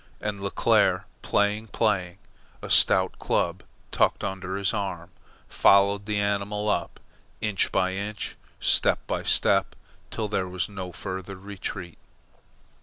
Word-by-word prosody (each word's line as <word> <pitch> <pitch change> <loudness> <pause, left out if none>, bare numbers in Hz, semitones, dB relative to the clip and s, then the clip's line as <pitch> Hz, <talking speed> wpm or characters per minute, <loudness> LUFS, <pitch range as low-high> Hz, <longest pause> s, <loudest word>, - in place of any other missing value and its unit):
And 105 -1 -3
Leclere, 100 - +2 0.2
playing, 105 +2 +1
playing, 95 -5 0 0.5
a - - -4
stout - - +5
club 85 +2 0 0.3
tucked - - +1
under 95 -1 -3
his 100 +2 0
arm, 90 -4 -4 0.4
followed 100 +1 +4
the 105 -1 -1
animal 100 +1 -1
up, 85 -4 -2 0.4
inch 105 -3 0
by 95 0 +1
inch, 100 +2 -4 0.2
step - - +2
by - - -2
step, - - +2 0.3
till 110 - -3
there 95 -3 -1
was 90 -1 -2
no 95 -3 -7
further 95 +3 -6
retreat. 95 -2 -7
100 Hz, 125 wpm, -26 LUFS, 95-105 Hz, 0.5 s, stout